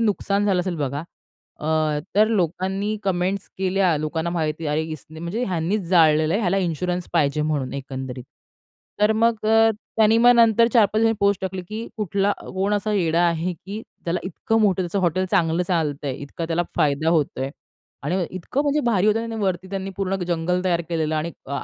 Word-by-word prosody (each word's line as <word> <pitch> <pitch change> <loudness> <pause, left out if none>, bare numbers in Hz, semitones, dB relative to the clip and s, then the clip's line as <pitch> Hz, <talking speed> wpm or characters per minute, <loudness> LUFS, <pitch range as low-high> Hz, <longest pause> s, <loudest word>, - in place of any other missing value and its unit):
नुकसान 205 -2 +1
झालं 190 -3 +2
असेल 180 -2 -3
बघा. 145 0 -2 0.6
अ, 155 -1 +1 0.2
तर 215 +1 +5
लोकांनी 195 +2 -1
कमेंट्स 190 +1 -1
केल्या, 185 -3 +2
लोकांना 160 +3 -2
माहिती 160 -2 -2
अरे, 150 +2 0
इसने 155 0 -8
म्हणजे 195 +9 -2
ह्यांनीच 185 +1 -1
जाळलेलं 160 -2 +4
आहे. 215 - +1
ह्याला 195 -1 +1
इन्शुरन्स 180 0 -2
पाहिजे 150 -2 +2
म्हणून 145 -4 -1
एकंदरीत. 130 -2 -6 0.8
तर 210 +1 +4
मग 225 -1 +1
अ, 225 0 +5 0.3
त्यांनी 220 +1 +5
मग 245 +1 +7
नंतर 230 -1 +5
4-5 215 -2 +4
दिवासांनी 225 0 +3
पोस्ट 200 -1 +2
टाकली, 190 -1 -4
की 220 +2 -5
कुठला 200 0 0 0.2
कोण 195 +2 +1
असा 210 +1 -1
येडा 170 -4 +2
आहे, 170 +2 -1
की 200 +6 -8 0.2
त्याला 175 +1 -1
इतकं 225 +5 -1
मोठं 190 -3 +3
त्याचं 175 +3 -2
हॉटेल 185 +1 +1
चांगलं 175 -3 +2
चालतंय, 145 -5 -1
इतका 145 +4 -6
त्याला 170 +1 0
फायदा 150 +2 +2
होतोय 145 -4 0 0.5
आणि 170 +6 0
इतकं 185 - -2
म्हणजे 290 +1 +1
भारी 210 -4 +2
होतं. 225 +1 +1
वरती 185 -1 -1
त्यांनी 195 0 -4
पूर्ण 195 -1 -1
जंगल 175 +1 0
तयार 175 -2 +2
केलेलं 160 -2 -1
आणि 155 +2 -1 0.2
अ, 140 +1 -3
180 Hz, 175 wpm, -23 LUFS, 160-205 Hz, 0.8 s, मग